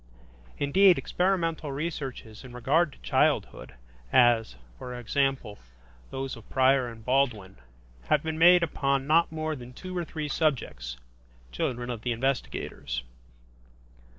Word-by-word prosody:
Indeed, 185 +6 +5
experimental 170 -5 -1
researches 135 -7 -5
in 125 -2 -11
regard 145 +7 +2
to - - -18
childhood, - - 0 0.4
as, 120 - +4 0.2
for 125 0 -7
example, 130 -3 -1 0.5
those 135 0 -4
of 115 - -15
Preyer 130 -1 +3
and 110 -1 -13
Baldwin, 125 - 0 0.5
have 150 - +2
been 160 0 -3
made 175 +1 +7
upon 140 -4 0
not 160 +3 +3
more 155 0 -3
than 125 -2 -10
two 185 +6 -8
or 175 - -1
three 155 -2 -5
subjects, 75 - -1 0.5
children 120 - -2
of 115 -3 -6
the 120 0 -1
investigators. 115 - -3
135 Hz, 125 wpm, -27 LUFS, 120-155 Hz, 0.5 s, made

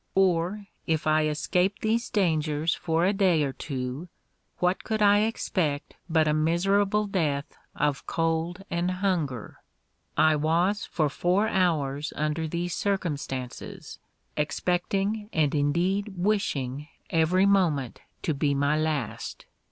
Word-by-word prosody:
Or 190 +2 +2 0.2
if 160 -2 0
I 155 0 +3
escaped 180 +6 0
these 230 +2 +1
dangers 160 -4 +1
for 165 0 0
a 195 - +3
day 185 -6 +3
or 135 -2 -2
two, 130 +4 -5 0.5
what 180 +1 0
could 220 -1 -1
I 205 0 +5
expect 180 -9 -1 0.2
but 160 -1 +3
a 150 - +3
miserable 195 +7 +2
death 155 -8 -1 0.2
of 145 -2 -1
cold 165 +3 -1
and 175 +1 0
hunger? 180 - -2 0.6
I 155 -1 +5
was 170 +7 +1
for 155 -3 0
four 180 +8 +1
hours 150 -7 0
under 155 +2 -1
these 170 +2 -2
circumstances, 145 -11 -3 0.4
expecting, 195 +7 -1
and 155 -3 +2
indeed 180 +8 0
wishing, 150 -8 -1 0.2
every 170 +4 +3
moment 170 - +1 0.2
to 160 - +1
be 140 0 +1
my 145 +2 +2
last. 155 -7 -3
165 Hz, 125 wpm, -27 LUFS, 150-195 Hz, 0.6 s, I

